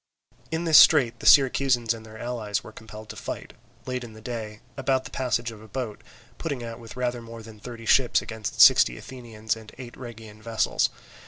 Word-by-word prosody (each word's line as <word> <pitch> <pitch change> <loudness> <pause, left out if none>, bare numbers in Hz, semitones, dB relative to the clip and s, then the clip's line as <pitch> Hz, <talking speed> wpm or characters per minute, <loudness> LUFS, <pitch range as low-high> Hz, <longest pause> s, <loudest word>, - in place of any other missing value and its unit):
In 160 +1 -2
this 160 -2 +8
strait 120 -7 +5
the - - -2
Syracusans 130 -4 +5
and 115 -1 -10
their 110 0 -12
allies 110 -3 -3
were - - -11
compelled 110 0 -11
to - - -7
fight, - - -7 0.3
late 125 -1 -3
in 115 -2 -10
the 110 - -13
day, 110 -2 -6
about 135 -1 0
the - - -9
passage 120 -3 -1
of 110 -2 -12
a 110 - -13
boat, 110 -1 -5 0.4
putting 140 -7 -4
out 115 0 -7
with 115 +1 -11
rather 125 -1 -2
more 115 0 -10
than 110 -1 -13
thirty 115 +1 -9
ships 125 +1 +4
against 110 -3 -6
sixteen - - +7
Athenian 115 -4 -11
and 110 -1 -12
eight 125 -2 -9
Rhegian 115 -3 -11
vessels. 115 0 +1
115 Hz, 195 wpm, -25 LUFS, 110-125 Hz, 0.4 s, this